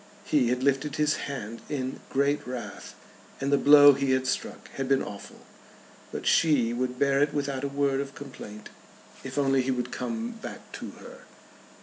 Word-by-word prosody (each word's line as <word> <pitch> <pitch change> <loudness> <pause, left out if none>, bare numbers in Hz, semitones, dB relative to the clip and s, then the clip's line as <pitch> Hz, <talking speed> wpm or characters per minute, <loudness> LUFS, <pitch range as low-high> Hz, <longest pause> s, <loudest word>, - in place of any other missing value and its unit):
He 140 -5 +3
had 125 +1 0
lifted 140 +1 +1
his 150 0 +2
hand 115 -4 -6
in 130 -3 -3
great 140 0 +1
wrath, 125 -1 -7 0.4
and 140 +1 0
the - - +6
blow 145 0 +9
he 135 -1 +1
had 130 0 +1
struck 130 - -3
had 135 -1 -4
been 135 -1 +3
awful. 100 - -9 0.7
But - - -5
she 135 -8 +3
would 125 +1 -2
bear 140 0 +2
it 150 0 +1
without 140 -2 -2
a - - 0
word 140 -1 0
of 140 -1 -7
complaint 105 -7 -10 0.5
if 130 +1 -7
only 135 -2 +3
he 130 - -3
would 125 -1 -1
come 230 +1 -3
back 225 -1 -9
to - - -7
her. - - -12
135 Hz, 180 wpm, -27 LUFS, 130-145 Hz, 0.7 s, blow